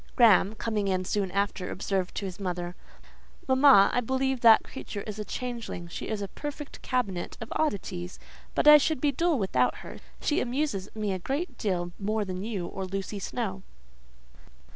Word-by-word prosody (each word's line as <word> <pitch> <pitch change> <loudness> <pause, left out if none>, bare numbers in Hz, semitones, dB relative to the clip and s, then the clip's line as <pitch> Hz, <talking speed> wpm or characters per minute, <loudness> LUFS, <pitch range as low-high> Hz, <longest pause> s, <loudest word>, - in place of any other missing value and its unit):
Graham, 220 -3 +5
coming 215 -2 -1
in 185 -1 0
soon 200 0 0
after, 200 -1 -1
observed 190 -1 -2
to 200 - -3
his 190 +1 -6
mother,—"Mamma, 195 +7 +2
I 245 - +2
believe 265 +1 -1
that 225 -2 +7
creature 205 - -7
is 215 -1 -6
a - - -2
changeling: 230 -5 -5
she - - -6
is 210 -2 -2
a - - -3
perfect 295 +6 -7
cabinet 200 -9 -2
of 225 - -6
oddities; 185 - -2 0.4
but - - +2
I 300 0 +11
should 310 0 0
be 290 +2 +2
dull 330 +3 +1
without 130 - +1
her: - - -9 0.2
she 295 - +1
amuses 245 -6 -2
me 210 -3 -1
a 185 - -3
great 275 - -3
deal 180 -6 -2
more 210 +1 -1
than 185 -1 -4
you 205 -5 -3
or 190 +2 -5
Lucy 195 +2 -4
Snowe." 195 -2 -3
210 Hz, 170 wpm, -28 LUFS, 190-250 Hz, 0.4 s, I